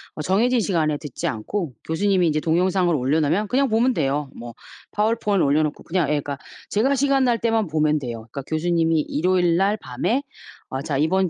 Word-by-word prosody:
어 - - -5
정해진 235 +9 +2
시간에 160 -7 0
듣지 145 -4 -5
않고 140 - -3
교수님이 185 +2 +2
이제 155 -1 +1
동영상을 175 +2 +1
올려놓으면 155 +8 +1
그냥 270 +1 +2
보면 235 +4 +2
돼요. 140 - -1
뭐 120 0 -9 0.4
파워포인트 210 -2 +1
올려놓고 150 +1 +1
그냥 170 -3 0
예 - - +2
그니까 145 -1 -2 0.3
제가 260 +7 +2
시간 275 0 +2
날 240 -2 +2
때만 225 -3 +1
보면 155 -1 +1
돼요. 120 -4 -6
그니까 140 - -5
교수님이 165 0 +1
일요일 175 +2 +1
날 200 +3 +2
밤에 215 - -2 0.5
"어 130 +1 -4
자 140 -1 -2
이번 185 +6 +2
170 Hz, 405 characters per minute, -22 LUFS, 150-205 Hz, 0.5 s, 정해진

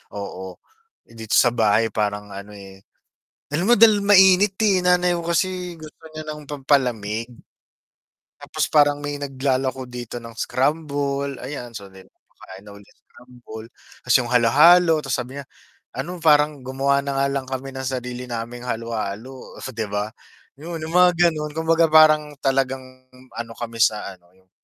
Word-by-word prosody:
oo. 95 -2 -7 0.5
Eh, - - -24
dito 110 0 -2
sa 120 - +5
bahay 110 -1 +2
parang 105 -1 -2
ano, 100 +1 -9
eh 95 -1 -13 0.7
alam 175 +8 -1
mo - - +8
dahil 215 -1 +6
mainit, 190 0 +5
eh, 190 -3 +3
nanay 180 0 +3
ko 170 - -3
kasi, 180 0 -2
gusto 155 +1 -13
niya 155 0 -8
ng 150 0 -7
pampalamig. 125 -6 -1 1.1
Tapos, - - -3
parang 145 -1 +3
may 145 0 -4
naglalako 130 -2 -2
dito 120 -1 -7
ng 115 -1 -11
scramble, 140 0 -2
ayan, 125 -2 -7
so 100 -3 -9
then, 95 0 -16
kumakain 95 +2 -16
ako 100 - -12
ng - - -24
scramble, 120 -3 -13 0.4
tas 125 - +2
yung 120 - -5
halo-halo, 155 +8 +5
tas 135 -4 -2
sabi 130 +3 -6
niya, 140 - -9 0.5
ano, 175 +7 -5
parang 150 -2 +3
gumawa 135 +2 0
na 140 0 -4
nga 135 0 +2
lang 135 -1 -3
kami 135 +1 -5
ng 130 0 -5
sarili 125 -1 -5
naming 120 +1 -6
halo-halo, 115 +2 -5
oh, - - -11
'di 110 -3 -4
ba? 105 +1 -3 0.5
'Yon, 165 +1 -7
yung 160 - -7
mga 180 0 +6 0.2
gano'n, 150 -1 -5
kumbaga 165 +1 +2
parang 155 -1 +5
talagang 135 -1 0 0.5
ano 115 -1 -7
kami 115 -1 -7
sa 110 -1 +2
ano 90 -2 -19
yung, 95 0 -31
135 Hz, 160 wpm, -22 LUFS, 115-155 Hz, 1.1 s, mo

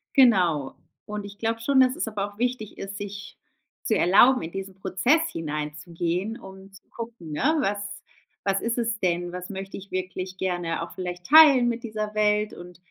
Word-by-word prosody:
Genau. 180 - +4 0.3
Und 210 -1 -5
ich 205 0 -10
glaube 225 +1 -2
schon, 270 +3 +3
dass 255 0 +4
es - - -2
aber 205 -2 -2
auch - - -23
wichtig 245 -2 -2
ist, 195 0 -6
sich 205 0 -8 0.5
zu - - +1
erlauben, 240 +9 +5
in 165 - -6
diesen 195 0 -6
Prozess 190 - +2
hineinzugehen, 165 +6 -3
um 190 0 -12
zu 195 - -16
gucken, 230 -9 -8
ne. 295 - +1
„Was 205 -5 0 0.7
was 195 0 +1
ist 230 +1 -1
es 230 -1 0
denn? 175 -1 -1
Was 180 0 -6
möchte 195 0 -6
ich 195 0 -10
wirklich 185 0 -4
gerne 175 -3 -2
auch 170 - -6
vielleicht 180 -1 -5
teilen 285 - +8
mit 235 0 -2
dieser 215 -2 -4
Welt 210 0 +2
und“ 175 0 -11
195 Hz, 180 wpm, -25 LUFS, 180-230 Hz, 0.7 s, teilen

